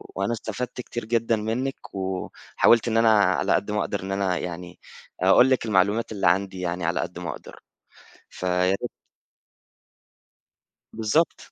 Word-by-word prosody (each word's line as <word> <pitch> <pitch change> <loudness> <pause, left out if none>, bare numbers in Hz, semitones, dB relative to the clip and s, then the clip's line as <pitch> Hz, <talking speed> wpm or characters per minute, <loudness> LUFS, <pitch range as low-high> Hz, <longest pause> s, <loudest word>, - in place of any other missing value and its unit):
وأنا 100 +4 -1
استفدت 120 +3 -5
كتير 120 -2 -6
جدًا 115 0 +1
منِّك، 115 +5 -4
وحاولت 95 +4 +1
إن 115 0 +1
أنا 115 0 +5
على - - +2
قد 105 - 0
ما 105 - 0
أقدر 100 - -2
إن 95 - -5
أنا 95 -2 0
يعني 90 0 -7 0.4
أقول 95 +8 +6
لِك 130 -3 +1
المعلومات 105 +2 +1
اللي 100 - 0
عندي 95 0 +1
يعني 90 -1 -3
على 85 +2 0
قد 85 0 -4
ما 85 -1 -5
أقدر، - - -11 0.7
فياريت 90 +1 0 2.0
بالضبط. 115 +10 0
100 Hz, 140 wpm, -24 LUFS, 90-115 Hz, 2.0 s, أقول